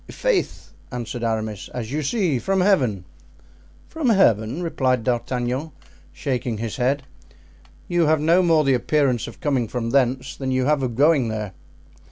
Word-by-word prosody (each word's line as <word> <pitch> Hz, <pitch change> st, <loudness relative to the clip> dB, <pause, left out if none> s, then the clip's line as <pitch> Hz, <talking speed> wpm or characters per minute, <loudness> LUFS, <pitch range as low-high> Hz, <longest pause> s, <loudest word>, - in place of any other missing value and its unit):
"I'faith!" -, -, -1 dB, 0.2 s
answered 120 Hz, -1 st, -5 dB
Aramis, 110 Hz, -3 st, -2 dB
"as 120 Hz, -1 st, -4 dB
you 150 Hz, +2 st, -1 dB
see, 155 Hz, -, 0 dB
from 195 Hz, +6 st, 0 dB
Heaven." 125 Hz, -, +2 dB, 0.8 s
"From 320 Hz, -6 st, -1 dB
Heaven," 125 Hz, -, +3 dB
replied 130 Hz, -7 st, 0 dB
D'Artagnan, 125 Hz, +4 st, -2 dB, 0.4 s
shaking 125 Hz, -5 st, -3 dB
his 115 Hz, 0 st, -4 dB
head; 135 Hz, +2 st, 0 dB, 0.8 s
"you 175 Hz, -2 st, +2 dB
have 155 Hz, 0 st, +3 dB
no 165 Hz, +4 st, +4 dB
more 165 Hz, -3 st, +3 dB
the 135 Hz, -1 st, +3 dB
appearance 130 Hz, -1 st, +1 dB
of -, -, -11 dB
coming 135 Hz, -6 st, 0 dB
from 115 Hz, 0 st, -3 dB
thence 130 Hz, 0 st, +1 dB
than 135 Hz, -1 st, -4 dB
you 130 Hz, 0 st, +1 dB
have 150 Hz, 0 st, +2 dB
of 125 Hz, -3 st, -2 dB
going 145 Hz, -1 st, +4 dB
there." 105 Hz, -3 st, -4 dB
130 Hz, 155 wpm, -22 LUFS, 120-155 Hz, 0.8 s, no